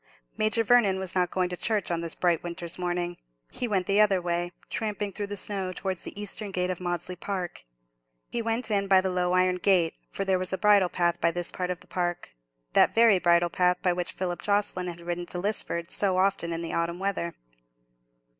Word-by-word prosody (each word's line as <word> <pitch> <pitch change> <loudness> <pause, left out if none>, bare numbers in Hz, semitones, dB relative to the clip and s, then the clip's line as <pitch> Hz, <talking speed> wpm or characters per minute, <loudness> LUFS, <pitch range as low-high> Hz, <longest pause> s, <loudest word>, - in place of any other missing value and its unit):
Major 215 +2 +1
Vernon 220 -4 +4
was 190 -1 -4
not 180 -1 +1
going 185 -1 0
to 180 - -3
church 210 -1 0
on 170 -1 0
this 165 -1 -2
bright 175 -3 +1
winter's 170 0 -4
morning. 175 0 -2 0.3
He 245 - -2
went 195 -4 0
the 200 +3 +3
other 200 -3 +4
way, 175 0 -1 0.2
tramping 210 -2 -2
through 205 +1 -3
the 205 0 -3
snow, 190 -1 -1
towards 185 -1 -3
the - - -8
eastern 205 0 -5
gate 180 -1 -1
of 180 - -5
Maudesley 175 0 -3
Park. 180 - -5 0.7
He 235 - -1
went 230 +1 -1
in 200 -1 +1
by 190 -1 +6
the 190 0 -1
low 180 0 +1
iron 185 0 +3
gate, 180 -3 +3 0.2
for 195 - -3
there 190 -1 +2
was 185 0 -1
a 190 - 0
bridle 205 -3 +5
path 175 -1 0
by 170 - +4
this 175 +1 -3
part 180 -1 -3
of 180 -1 -3
the - - -17
park—that - - -1
very 225 -4 +6
bridle 175 -1 +3
path 180 0 +2
by 180 - +3
which 175 0 -2
Philip 180 -2 -3
Jocelyn 200 -3 0
had 170 -1 -6
ridden 175 0 -4
to - - -4
Lisford 175 -3 -2
so 190 -3 +1
often 185 -3 +1
in 165 0 -3
the 165 - -4
autumn 170 +1 -1
weather. 185 -3 -2
180 Hz, 210 wpm, -27 LUFS, 175-200 Hz, 0.7 s, by